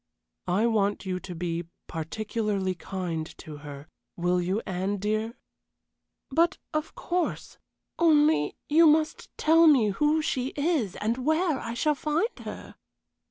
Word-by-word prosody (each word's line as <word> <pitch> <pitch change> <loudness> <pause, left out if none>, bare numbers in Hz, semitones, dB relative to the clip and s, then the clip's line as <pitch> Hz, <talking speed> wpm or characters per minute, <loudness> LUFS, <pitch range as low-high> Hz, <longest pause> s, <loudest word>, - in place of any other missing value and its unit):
I 190 +5 +2
want 205 -3 +1
you 185 -1 -2
to 185 -1 -8
be 170 0 -3 0.2
particularly 200 +3 -2
kind 175 -3 -4
to 150 -1 -9
her, 145 0 -10 0.3
will 180 +1 +1
you, 190 +5 -1
Anne, 190 +2 -2
dear?" 215 +3 -1 1.0
"But, 340 +6 +3 0.2
of 310 +1 -2
course; 355 0 -3 0.4
only 305 - +4
you 325 +2 +6
must 310 0 +2
tell 325 +1 +5
me 255 -9 +5
who 300 +9 +2
she 260 -3 -1
is 285 - 0
and 230 +4 -2
where 315 0 +2
I 230 +1 -5
shall 300 +5 +2
find 310 - -1
her." - - -8
220 Hz, 135 wpm, -27 LUFS, 185-305 Hz, 1.0 s, you